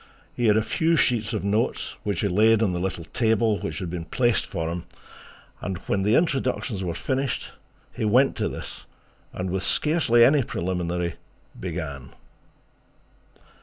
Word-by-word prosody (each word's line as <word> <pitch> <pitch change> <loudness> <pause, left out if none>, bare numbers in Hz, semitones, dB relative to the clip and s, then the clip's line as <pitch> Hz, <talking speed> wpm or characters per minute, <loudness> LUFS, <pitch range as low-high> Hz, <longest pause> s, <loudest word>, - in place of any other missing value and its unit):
He 120 - +1
had 105 0 +5
a 110 - +2
few 165 +7 +1
sheets 115 -8 +2
of 110 - -2
notes, 105 +3 0
which 100 -4 -2
he 105 - +1
laid 110 +4 +4
on 95 -5 +1
the 90 - -2
little 90 -2 -3
table 110 +1 +1
which 80 -2 -4
had 85 -1 -4
been 85 -2 -4
placed 120 +6 +1
for 80 -1 -3
him, 85 0 -5 0.8
and 95 -2 -3
when 95 - 0
the 105 +4 +3
introductions 130 - 0
were 85 -2 -3
finished 135 +6 -2 0.4
he - - -4
went 125 +6 +4
to - - 0
this - - -8 0.4
and 90 0 -4
with 95 0 -1
scarcely 130 - +4
any 145 +2 +5
preliminary 90 -4 -2 0.4
began. 80 -7 -5
105 Hz, 160 wpm, -25 LUFS, 90-120 Hz, 0.8 s, had